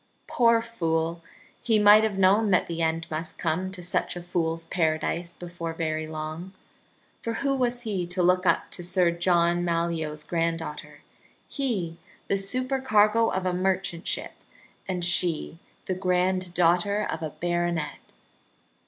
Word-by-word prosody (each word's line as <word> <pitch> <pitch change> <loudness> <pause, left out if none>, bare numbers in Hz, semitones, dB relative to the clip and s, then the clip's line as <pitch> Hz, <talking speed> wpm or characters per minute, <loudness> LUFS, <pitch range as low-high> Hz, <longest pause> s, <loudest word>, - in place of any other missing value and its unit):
Poor 230 -2 +3
fool! 165 -6 -2 0.4
He 225 -2 +2
might 210 +1 +7
have 215 -3 0
known 200 +3 +4
that 185 - +3
the 170 -1 -4
end 165 0 0
must 160 +1 -4
come 175 +3 -1
to 185 -2 -8
such 175 - -1
a 175 - -6
fool's 165 -2 -1
paradise 170 +1 -1
before 170 -2 -6
very 155 -1 -2
long. 155 +4 -6 0.7
For 230 - -3
who 275 +4 0
was 245 -2 0
he 195 -6 -2
to 180 +1 -1
look 180 +1 +3
up - - +1
to - - -6
Sir 180 -1 +2
John 175 0 +2
Malyoe's 165 -3 -1
granddaughter, 165 -2 -3 0.5
he, 200 - -3 0.3
the - - +3
supercargo 230 0 +2
of 190 0 -2
a 180 - +1
merchant 185 -1 -1
ship, - - -2 0.5
and 180 -2 -1
she 175 -2 +1 0.3
the 185 - -1
granddaughter 180 +1 +1
of - - -4
a 160 - -3
baronet. 175 0 -2
175 Hz, 145 wpm, -26 LUFS, 165-195 Hz, 0.7 s, might